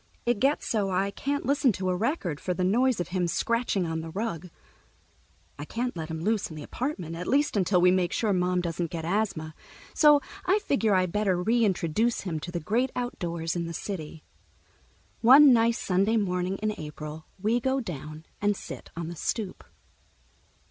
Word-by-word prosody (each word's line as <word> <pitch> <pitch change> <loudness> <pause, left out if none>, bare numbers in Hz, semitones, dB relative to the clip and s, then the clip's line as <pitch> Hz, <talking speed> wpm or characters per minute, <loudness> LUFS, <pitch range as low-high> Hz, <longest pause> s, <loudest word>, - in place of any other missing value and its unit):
It 240 -3 +1
gets 275 +6 +1
so 205 -4 0
I 190 +2 0
can't 285 +6 -2
listen 275 -1 +3
to 185 0 -2
a - - 0
record, 195 - -1
for 180 - -2
the 185 - -1
noise 240 +5 +2
of 175 - -3
him 180 -1 0
scratching 230 0 0
on 160 -1 -2
the 165 - -7
rug. 180 -2 -4 1.1
I 145 - -5
can't 245 +8 -3
let 160 -1 -5
him 160 0 -4
loose 215 +3 0
in 160 - -9
the 150 - -7
apartment, 185 - -4
at 175 +2 -5
least 290 0 +2
until 185 -2 +3
we 180 +1 +5
make 180 -2 +1
sure 215 -3 +1
Mom 180 0 +1
doesn't 170 -1 -2
get 165 -1 -5
asthma, 170 -5 -1 0.4
so 295 -1 +6 0.2
I 380 +2 +3
figure 245 - +1
I 185 0 +3
better 190 0 0
reintroduce 220 0 +1
him 170 -5 -3
to 175 - -7
the 175 - -2
great 240 +10 0
outdoors 170 -9 -3
in 170 -1 -2
the 170 - -5
city. 160 -5 -6 1.0
One 270 +3 +8
nice 230 0 +3
Sunday 195 +5 +1
morning 185 -2 -1
in 215 0 +1
April 150 +1 -7
we 220 +5 +1
go 265 +2 0
down 155 - -7 0.2
and 205 -1 +1
sit - - -9
on 170 -1 -3
the 175 - -6
stoop. 200 +3 -3
190 Hz, 185 wpm, -27 LUFS, 170-230 Hz, 1.1 s, One